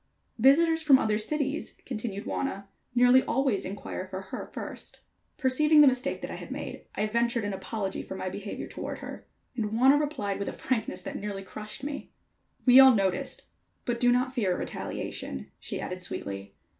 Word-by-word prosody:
"Visitors 320 Hz, +6 st, +5 dB
from 290 Hz, -4 st, +7 dB
other 215 Hz, -4 st, +1 dB
cities," 285 Hz, +5 st, -2 dB
continued 215 Hz, -4 st, -4 dB
Wauna, 200 Hz, -7 st, -2 dB, 0.3 s
"nearly 245 Hz, +1 st, +7 dB
always 260 Hz, -6 st, 0 dB
inquire 190 Hz, -1 st, -5 dB
for 190 Hz, 0 st, -5 dB
her 190 Hz, -, -6 dB
first." -, -, -7 dB, 0.4 s
Perceiving 300 Hz, +2 st, +5 dB
the 290 Hz, -, +8 dB
mistake 260 Hz, +1 st, +1 dB
that -, -, -4 dB
I -, -, -5 dB
had -, -, -9 dB
made, -, -, -6 dB
I 210 Hz, -, +1 dB
ventured 235 Hz, +1 st, +1 dB
an 205 Hz, -1 st, -2 dB
apology 195 Hz, 0 st, -3 dB
for 190 Hz, -, -7 dB
my 185 Hz, -, -4 dB
behavior 200 Hz, +2 st, -5 dB
toward -, -, -5 dB
her, -, -, -9 dB, 0.3 s
and 215 Hz, -3 st, -2 dB
Wauna 265 Hz, +5 st, +6 dB
replied, 270 Hz, -11 st, -2 dB
with 200 Hz, -, -2 dB
a -, -, -6 dB
frankness 220 Hz, -7 st, -2 dB
that -, -, -5 dB
nearly 200 Hz, -1 st, -4 dB
crushed 215 Hz, +6 st, -7 dB
me: 285 Hz, 0 st, -5 dB, 0.6 s
"We 255 Hz, 0 st, +9 dB
all 265 Hz, -2 st, +9 dB
noticed 190 Hz, -3 st, 0 dB
it, -, -, -26 dB, 0.4 s
but 240 Hz, -1 st, -1 dB
do 245 Hz, 0 st, +5 dB
not 255 Hz, +1 st, +1 dB
fear 200 Hz, -8 st, +1 dB
a -, -, -4 dB
retaliation," 65 Hz, 0 st, -4 dB
she -, -, -5 dB
added 180 Hz, 0 st, -5 dB
sweetly. 100 Hz, -, -4 dB
235 Hz, 180 wpm, -28 LUFS, 200-265 Hz, 0.6 s, We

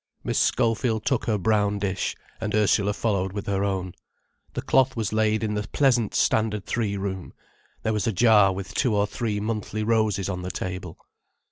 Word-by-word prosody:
Miss -, -, 0 dB
Schofield 115 Hz, -2 st, +1 dB
took 135 Hz, -, +1 dB
her 110 Hz, -2 st, +1 dB
brown 105 Hz, +1 st, +1 dB
dish, 100 Hz, -1 st, -2 dB, 0.2 s
and 105 Hz, -1 st, -2 dB
Ursula 105 Hz, -1 st, +3 dB
followed 100 Hz, -3 st, -1 dB
with 100 Hz, -1 st, -4 dB
her 100 Hz, -1 st, 0 dB
own. 95 Hz, -3 st, -2 dB, 0.6 s
The -, -, -3 dB
cloth 130 Hz, 0 st, +3 dB
was 110 Hz, -3 st, -2 dB
laid 110 Hz, 0 st, +2 dB
in 105 Hz, -1 st, -1 dB
the 105 Hz, 0 st, -3 dB
pleasant 125 Hz, -6 st, +2 dB
Standard 105 Hz, -2 st, +1 dB
Three 105 Hz, -4 st, -1 dB
room, 95 Hz, -2 st, -5 dB, 0.5 s
there 110 Hz, -, 0 dB
was 105 Hz, -1 st, -1 dB
a -, -, +2 dB
jar 105 Hz, -1 st, +5 dB
with 95 Hz, 0 st, -6 dB
two 125 Hz, -6 st, +1 dB
or 100 Hz, 0 st, +3 dB
three 105 Hz, -1 st, -2 dB
monthly 110 Hz, 0 st, -3 dB
roses 110 Hz, -3 st, +1 dB
on 90 Hz, -2 st, -3 dB
the 90 Hz, -, -4 dB
table. 90 Hz, -2 st, -5 dB
105 Hz, 180 wpm, -25 LUFS, 100-110 Hz, 0.6 s, jar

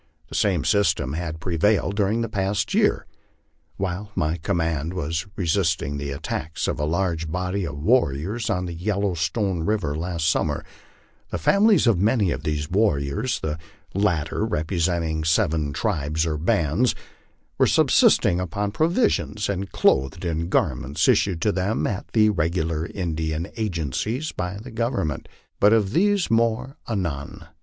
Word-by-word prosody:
The -, -, -11 dB
same 95 Hz, -7 st, +1 dB
system 100 Hz, -10 st, +2 dB
has 80 Hz, -1 st, -3 dB
prevailed 95 Hz, +4 st, +1 dB
during 105 Hz, +2 st, +1 dB
the 115 Hz, -, -1 dB
past 100 Hz, -1 st, -1 dB
year. -, -, +2 dB, 0.7 s
While 95 Hz, +2 st, -3 dB
my 80 Hz, -1 st, 0 dB
command 80 Hz, -1 st, -1 dB
was 80 Hz, 0 st, -2 dB
resist 85 Hz, -2 st, +1 dB
ing 70 Hz, +1 st, -3 dB
the 70 Hz, 0 st, -4 dB
attacks 75 Hz, +3 st, -3 dB
of -, -, -2 dB
a 75 Hz, -, 0 dB
large 80 Hz, -1 st, -1 dB
body 90 Hz, +2 st, -2 dB
of 70 Hz, -, -6 dB
warriors 100 Hz, -, +1 dB
on 90 Hz, -3 st, 0 dB
the 85 Hz, -, -5 dB
Yellowstone 95 Hz, 0 st, -1 dB
river 85 Hz, -6 st, -1 dB
last 85 Hz, 0 st, -2 dB
sum 80 Hz, -, +2 dB
mer, -, -, -3 dB, 0.6 s
the -, -, -2 dB
families 200 Hz, -, +4 dB
of 115 Hz, -7 st, +3 dB
many 105 Hz, -2 st, +2 dB
of -, -, -3 dB
these 75 Hz, -1 st, -2 dB
warriors, 95 Hz, -, 0 dB
the 80 Hz, 0 st, -3 dB, 0.3 s
latter 90 Hz, -3 st, 0 dB
representing 85 Hz, -4 st, -1 dB
seven 80 Hz, -3 st, +1 dB
tribes 75 Hz, +3 st, -1 dB
or 80 Hz, -2 st, -1 dB
bands, 80 Hz, -, +1 dB, 0.6 s
were -, -, +5 dB
subsisting 90 Hz, -, +4 dB
upon 100 Hz, +3 st, -2 dB
provisions 160 Hz, -, +1 dB
and 100 Hz, -1 st, -3 dB
clothed 70 Hz, +7 st, +2 dB
in 85 Hz, 0 st, -2 dB
garments 70 Hz, -4 st, 0 dB
issued 90 Hz, -5 st, +2 dB
to 105 Hz, -, +3 dB
them 100 Hz, +3 st, -1 dB
at 100 Hz, -2 st, -3 dB
the 110 Hz, -1 st, +5 dB
regular 80 Hz, -2 st, -1 dB
Indian 80 Hz, -1 st, -3 dB
agencies 110 Hz, -, -2 dB
by 90 Hz, +2 st, -4 dB
the 115 Hz, +5 st, -9 dB
Government. 115 Hz, -, -2 dB, 0.3 s
But 105 Hz, +2 st, +6 dB
of 105 Hz, -4 st, +2 dB
this 200 Hz, -, +2 dB
more 115 Hz, +4 st, +1 dB
anon. 85 Hz, -10 st, -3 dB
90 Hz, 150 wpm, -24 LUFS, 80-105 Hz, 0.7 s, But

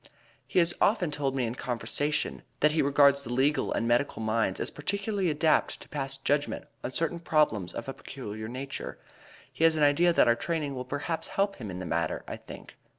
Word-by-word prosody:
He -, -, -3 dB
has 170 Hz, -1 st, +5 dB
often 195 Hz, -6 st, +3 dB
told 140 Hz, -2 st, -1 dB
me 130 Hz, -2 st, +1 dB
in 115 Hz, -, -2 dB
conversation, 130 Hz, +5 st, -1 dB, 0.2 s
that 150 Hz, -, +5 dB
he 155 Hz, -, +2 dB
regards 140 Hz, 0 st, +5 dB
the 120 Hz, -, -6 dB
legal 135 Hz, +4 st, +2 dB
and 115 Hz, -, 0 dB
medical 120 Hz, +3 st, +1 dB
minds 110 Hz, -3 st, 0 dB
as -, -, -1 dB
particularly 200 Hz, +4 st, -1 dB
adapted 155 Hz, +1 st, +2 dB
to -, -, -14 dB
pass 135 Hz, -2 st, -3 dB
judgment 145 Hz, +2 st, -1 dB, 0.2 s
on -, -, -3 dB
certain 165 Hz, +4 st, -1 dB
problems 150 Hz, -, +1 dB
of -, -, -6 dB
a 135 Hz, -, -3 dB
peculiar 110 Hz, -6 st, -7 dB
nature. 130 Hz, +3 st, -6 dB, 0.6 s
He -, -, -2 dB
has 165 Hz, -1 st, +6 dB
an 155 Hz, -, +2 dB
idea 145 Hz, +5 st, +5 dB
that 170 Hz, -, +4 dB
our 120 Hz, -, +6 dB
training 150 Hz, +1 st, -2 dB
will 130 Hz, -1 st, -5 dB
perhaps 160 Hz, +5 st, -3 dB
help 200 Hz, 0 st, 0 dB
him 110 Hz, -6 st, -6 dB
in 90 Hz, -, -5 dB
the 90 Hz, -, -5 dB
matter, 85 Hz, -1 st, -1 dB
I -, -, -5 dB
think." -, -, -11 dB
140 Hz, 205 wpm, -28 LUFS, 120-160 Hz, 0.6 s, has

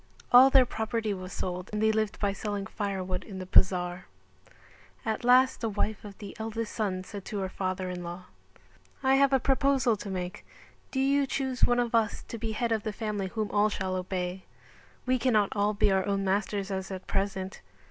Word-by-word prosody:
All 255 Hz, +2 st, +9 dB
their 265 Hz, -1 st, +6 dB
property 220 Hz, -2 st, -2 dB
was 185 Hz, -1 st, -7 dB
sold 180 Hz, 0 st, -4 dB
and 210 Hz, -, -2 dB
they 220 Hz, 0 st, +4 dB
lived 215 Hz, -1 st, -1 dB
by 200 Hz, -1 st, +1 dB
selling 205 Hz, 0 st, -3 dB
firewood 190 Hz, -3 st, -3 dB
in 195 Hz, -3 st, -9 dB
the 185 Hz, -, -5 dB
bazar. 180 Hz, -1 st, +2 dB, 1.0 s
At 220 Hz, 0 st, -2 dB
last 255 Hz, +2 st, +5 dB
the 225 Hz, -, 0 dB
wife 210 Hz, 0 st, -2 dB
of 205 Hz, -2 st, -10 dB
the 205 Hz, -2 st, -9 dB
eldest 225 Hz, 0 st, -4 dB
son 190 Hz, -4 st, -1 dB
said 200 Hz, 0 st, -8 dB
to 210 Hz, -, -4 dB
her 190 Hz, -1 st, -2 dB
father 185 Hz, 0 st, -3 dB
in 180 Hz, -1 st, -5 dB
law. 175 Hz, +1 st, -6 dB, 0.8 s
"I 265 Hz, 0 st, +4 dB
have 275 Hz, 0 st, +4 dB
a 270 Hz, -, +4 dB
proposal 270 Hz, -2 st, +2 dB
to 200 Hz, -, -7 dB
make: 180 Hz, -1 st, -4 dB, 0.5 s
Do 265 Hz, -, -2 dB
you 275 Hz, +1 st, +3 dB
choose 265 Hz, -2 st, +1 dB
one 245 Hz, 0 st, +2 dB
of 240 Hz, -1 st, 0 dB
us 225 Hz, -3 st, +1 dB
to 230 Hz, -, -5 dB
be 220 Hz, 0 st, -3 dB
head 235 Hz, +2 st, -1 dB
of 220 Hz, -1 st, +1 dB
the 215 Hz, -, -3 dB
family 210 Hz, -2 st, -3 dB
whom 215 Hz, +2 st, -3 dB
all 210 Hz, +1 st, +3 dB
shall 190 Hz, -2 st, -2 dB
obey; 185 Hz, 0 st, -3 dB, 0.6 s
we 255 Hz, 0 st, +2 dB
cannot 215 Hz, -6 st, +3 dB
all 205 Hz, +1 st, +1 dB
be 200 Hz, -, +3 dB
our 190 Hz, 0 st, +1 dB
own 200 Hz, -1 st, 0 dB
masters 200 Hz, 0 st, -1 dB
as 190 Hz, 0 st, -3 dB
at 190 Hz, -1 st, -6 dB
present." 195 Hz, -1 st, -2 dB
205 Hz, 200 wpm, -29 LUFS, 190-230 Hz, 1.0 s, All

